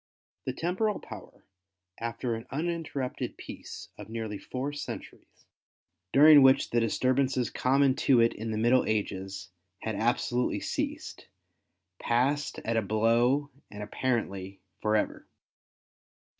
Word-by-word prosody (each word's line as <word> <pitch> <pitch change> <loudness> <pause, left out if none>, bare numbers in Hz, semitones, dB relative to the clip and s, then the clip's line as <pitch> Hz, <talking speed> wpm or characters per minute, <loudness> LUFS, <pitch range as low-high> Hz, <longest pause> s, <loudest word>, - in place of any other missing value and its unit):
The 130 - -2
Temporal 185 - -1
Power - - -12 0.5
after 115 +1 -3
an 115 0 -6
uninterrupted 155 -3 -3
peace - - -9
of - - -9
nearly 110 -3 -4
four 130 +7 -4
centuries, 145 - -8 0.7
during 150 +1 +8
which 135 0 +5
the 120 - +3
disturbances 130 +2 +1
common 135 +1 +3
to 130 -3 +4
it 115 0 +4
in 110 +1 -5
the 110 - -2
middle 120 +3 +4
ages, 95 -2 -3 0.3
had 110 - -2
absolutely 120 +2 0
ceased, - - -4 0.7
passed 135 +5 0
at 115 0 0
a - - +3
blow 115 +7 +2 0.2
and 105 0 -7
apparently 100 -4 -2 0.2
for 105 0 +2
ever. 105 - -1
120 Hz, 120 wpm, -29 LUFS, 110-135 Hz, 0.7 s, during